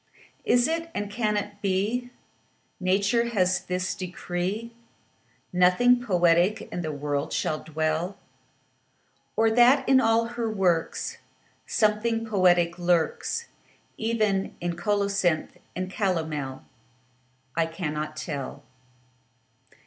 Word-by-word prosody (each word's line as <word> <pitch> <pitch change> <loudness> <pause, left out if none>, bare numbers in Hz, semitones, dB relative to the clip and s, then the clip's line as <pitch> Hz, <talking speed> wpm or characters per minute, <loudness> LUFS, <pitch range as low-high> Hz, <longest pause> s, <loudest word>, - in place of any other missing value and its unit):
Is 245 0 +4
it, 330 +1 -2
and 205 0 -3
can 210 -1 0
it 205 0 -5
be, 210 +6 0 0.7
Nature 200 +6 +2
hath 185 -4 +1
this 180 0 -1
decree, 185 +5 -4 0.8
Nothing 210 +8 +4
poetic 175 -1 +3
in 175 - -2
the 155 -2 -3
world 145 0 -2
shall 155 - -1
dwell? 160 +4 -2 1.2
Or 225 0 +3
that 250 +4 +5
in 265 -1 +6
all 225 0 +3
her 235 -1 -3
works 180 -6 0 0.5
Something 225 +1 +1
poetic 180 -5 +3
lurks, 175 - 0 0.5
Even 215 -4 0
in 175 0 -2
colocynth 195 -3 0 0.2
and 185 +1 -2
calomel? 160 -9 -2 0.9
I 165 0 +2
cannot 155 -2 -4
tell. 140 -4 -5
190 Hz, 105 wpm, -26 LUFS, 170-225 Hz, 1.2 s, in